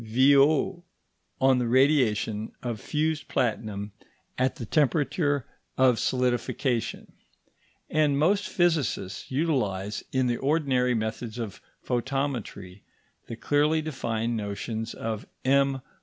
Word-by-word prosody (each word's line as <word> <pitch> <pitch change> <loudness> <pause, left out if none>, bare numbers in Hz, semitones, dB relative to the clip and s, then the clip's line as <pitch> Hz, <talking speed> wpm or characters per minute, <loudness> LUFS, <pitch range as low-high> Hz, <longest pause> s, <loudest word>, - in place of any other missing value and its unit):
Violle 140 - +4 0.6
on 130 -1 +4
the 120 - 0
radiation 115 -5 +2
of 115 -4 -4
fused 155 -1 -1
platinum 105 -4 -2 0.4
at 130 +1 0
the 120 - -6
temperature 145 - +1 0.3
of 130 -3 +4
solidification; 125 -1 -1 0.8
and 150 -2 +2
most 190 +7 +2
physicists 160 - 0
utilize 120 - -1
in 130 -1 +1
the 120 -1 0
ordinary 135 -4 +1
methods 110 +1 -3
of 115 -5 -6 0.2
photometry 125 -7 -3 0.5
the 115 - -5
clearly 150 +6 +2
defined 120 -7 -2
notions 110 +2 -4
of 110 -1 -4 0.2
M. 135 0 +2
130 Hz, 105 wpm, -27 LUFS, 115-145 Hz, 0.8 s, Violle